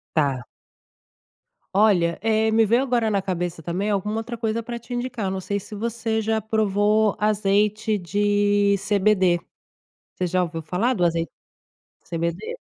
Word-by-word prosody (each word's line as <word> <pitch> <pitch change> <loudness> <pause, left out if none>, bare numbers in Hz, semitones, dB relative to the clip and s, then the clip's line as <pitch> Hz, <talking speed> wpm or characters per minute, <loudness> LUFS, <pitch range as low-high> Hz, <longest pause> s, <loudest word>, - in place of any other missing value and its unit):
Tá. 135 -5 +1 1.3
Olha, 185 -5 +3
eh, 220 0 +2
me 225 0 +4
veio 235 +5 +3
agora 240 -4 +1
na 200 -1 +1
cabeça 175 -3 -3
também 180 +6 -2
alguma 210 +1 -1
outra 235 +1 -5
coisa 225 0 -2
pra 235 +1 -5
te 235 +2 -9
indicar. 245 -3 -3
Eu 190 - -1
não 190 0 -3
sei 200 +2 -2
se 210 - -10
você 225 +1 -2
já 220 0 0
provou 215 0 +2
azeite 210 +1 +1
de 205 +1 +2
CBD. 190 -4 +3 0.7
Você 180 - -2
já 180 +1 +1
ouviu 165 -1 -4
falar 185 +11 0
do 180 -7 +1
azei 165 0 0 0.8
CBD? 170 - -3
205 Hz, 150 wpm, -23 LUFS, 185-220 Hz, 1.3 s, me